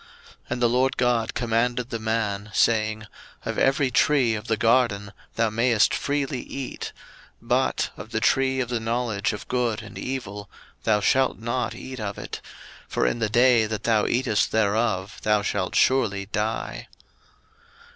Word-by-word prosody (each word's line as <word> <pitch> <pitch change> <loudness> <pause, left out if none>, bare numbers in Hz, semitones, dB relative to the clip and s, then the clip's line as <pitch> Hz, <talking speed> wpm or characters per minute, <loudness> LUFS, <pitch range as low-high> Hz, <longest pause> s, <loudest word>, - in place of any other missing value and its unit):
01:002:016 - - -20
And 125 - -3
the 120 - +5
LORD 130 +2 +1
God 120 -2 +1
commanded 120 +1 0
the 115 - -2
man, 110 -2 -2
saying, 110 -1 +2 0.4
Of - - -2
every 135 0 +2
tree 130 -2 +3
of 105 -1 -5
the 110 - +1
garden 115 -4 +2 0.2
thou 115 -1 +1
mayest 115 -1 +3
freely 140 -2 -1
eat: 135 -1 -6 0.5
01:002:017 - - -20
But - - +1
of - - -9
the 110 - -1
tree 130 +2 +2
of 120 - -3
the 120 -2 -1
knowledge 115 -2 -1
of 105 - -7
good 120 -4 -1
and - - -9
evil, 105 -6 -5 0.4
thou 105 -2 +3
shalt 130 +5 +2
not 120 +1 -2
eat 130 -1 -8
of 100 -2 -4
it: - - -7 0.5
for - - 0
in - - 0
the 110 -2 0
day 120 0 +4
that 110 -1 -4
thou 110 -2 +2
eatest 120 -4 +1
thereof 105 -2 0
thou 105 -1 +2
shalt 100 -2 -2
surely 110 -7 +2
die. 110 +2 -3
115 Hz, 165 wpm, -25 LUFS, 105-125 Hz, 0.5 s, the